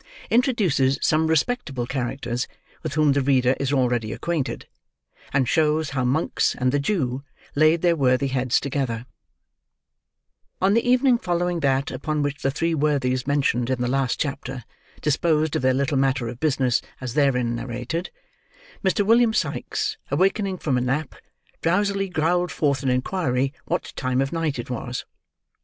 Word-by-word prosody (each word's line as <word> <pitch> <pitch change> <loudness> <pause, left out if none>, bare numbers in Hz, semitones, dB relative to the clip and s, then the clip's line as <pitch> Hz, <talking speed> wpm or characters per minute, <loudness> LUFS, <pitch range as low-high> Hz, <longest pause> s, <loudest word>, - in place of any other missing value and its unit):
INTRODUCES 200 - +2
SOME 160 +1 +3
RESPECTABLE 160 - 0
CHARACTERS 125 -1 -3 0.3
WITH 155 -2 -4
WHOM 155 -2 +4
THE 140 +1 +2
READER 130 -1 +3
IS 140 -1 -1
ALREADY 120 -5 +1
ACQUAINTED, 170 -6 -3 0.7
AND 135 -2 +2
SHOWS 155 +2 +2
HOW 130 -2 -1
MONKS 140 +7 +1
AND 125 0 +1
THE 145 - +1
JEW 140 -6 -1 0.3
LAID 155 +3 +3
THEIR 170 -1 +4
WORTHY 130 -1 +2
HEADS 130 -1 +1
TOGETHER 130 -4 -2 1.5
On 190 +2 +3
the 230 - +3
evening 250 -1 +4
following 175 -2 -1
that 135 -2 +1
upon 150 +3 -2
which 145 0 -3
the 135 - +1
three 165 +4 -1
worthies 140 -4 0
mentioned 135 -4 +1
in 130 -1 0
the 125 - 0
last 135 -1 0
chapter, 135 -3 -3 0.4
disposed 155 +1 +1
of - - 0
their 130 0 +3
little 140 +1 0
matter 135 -2 +1
of 120 +1 -7
business 135 -5 +1 0.2
as 125 -2 -5
therein 125 -5 +2
narrated, 125 +8 -4 0.7
Mr. 195 +1 +2
William 230 +1 +4
Sikes, 430 0 -1
awakening 195 0 +1
from 135 -7 0
a - - -2
nap, 135 +4 -1 0.5
drowsily 195 +3 +1
growled 175 +1 +1
forth 140 -4 0
an 135 - 0
inquiry 130 0 0
what - - -3
time 130 0 -1
of 135 +2 0
night 165 -4 -1
it 120 +1 -6
was. 125 0 -4
140 Hz, 155 wpm, -23 LUFS, 130-165 Hz, 1.5 s, WHOM